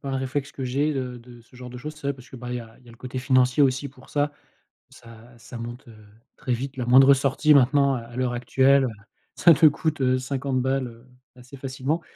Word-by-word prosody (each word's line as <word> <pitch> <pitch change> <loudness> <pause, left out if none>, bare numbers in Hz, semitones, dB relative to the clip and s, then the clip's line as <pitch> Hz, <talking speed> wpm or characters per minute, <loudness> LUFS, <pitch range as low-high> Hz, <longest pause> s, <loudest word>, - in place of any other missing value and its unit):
pas 140 - -7
un 135 - -1
réflexe 135 +2 -3
que 135 - -6
j'ai 140 +4 0
de 125 -2 -4
de 120 0 -15
ce 125 - -25
genre 125 0 -9
de 125 - -10
choses. 150 +5 -7
C'est 150 -2 -8
vrai 140 - 0
parce 125 -1 -16
que, 130 - -10
bah, 125 0 -8
il 125 - -2
y - - -4
a 115 -1 -13
il 130 - -24
y - - -16
a - - -12
le - - -17
côté 130 +1 -6
financier 130 +1 +3
aussi 135 +1 +1
pour 130 0 -18
ça. 145 0 -1 0.6
Ça 115 +1 -16
ça 120 +2 -11
monte, 120 +3 -8
heu, 110 - -14 0.4
très 125 - -2
vite, 135 +3 -5
la 125 - -3
moindre 135 +3 +7
sortie 140 +3 +2
maintenant, 140 0 +4
heu, - - -6
à 120 +1 -13
l'heure 125 -1 -1
actuelle, 130 +2 +3
heu, - - -2 0.5
ça 170 -2 +6
te 155 +2 +4
coûte, 155 +1 +2
heu, 130 0 +2
50 130 0 -2
balles, 130 0 -1
heu, 115 +1 -14 0.3
assez 125 +2 -14
facilement. 135 +4 -3
130 Hz, 255 wpm, -24 LUFS, 125-140 Hz, 0.6 s, moindre